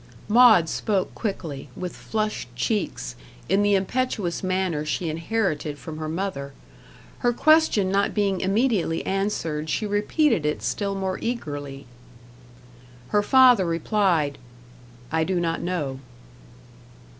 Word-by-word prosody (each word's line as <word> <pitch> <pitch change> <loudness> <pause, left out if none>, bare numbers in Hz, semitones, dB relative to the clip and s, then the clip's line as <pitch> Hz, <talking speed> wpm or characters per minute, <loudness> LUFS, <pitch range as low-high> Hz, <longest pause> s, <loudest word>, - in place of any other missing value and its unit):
Maud 220 -6 +6
spoke 195 +3 -1
quickly, 160 - -5
with 180 -1 -5
flushed 215 - -3
cheeks, 125 - -2 0.3
in 195 +2 +2
the 205 0 +3
impetuous 195 -2 -1
manner 185 -5 -1
she 160 +2 -2
inherited 160 -4 -2
from 155 +1 -8
her 155 0 -4
mother. 160 -6 -4 0.7
Her 245 - +2
question 310 -8 +3
not 200 +1 +1
being 200 -3 +1
immediately 195 -4 +1
answered, 165 -6 -2
she 215 - -1
repeated 210 - +1
it 150 -8 -1
still 195 - -2
more 190 -1 -2
eagerly. 145 - -5 1.2
Her 210 - +3
father 250 -4 +5
replied 165 -3 +1 0.7
"I 160 0 +1
do 180 +1 0
not 165 -1 -1
know." 150 -7 -3
185 Hz, 120 wpm, -24 LUFS, 155-210 Hz, 1.2 s, Maud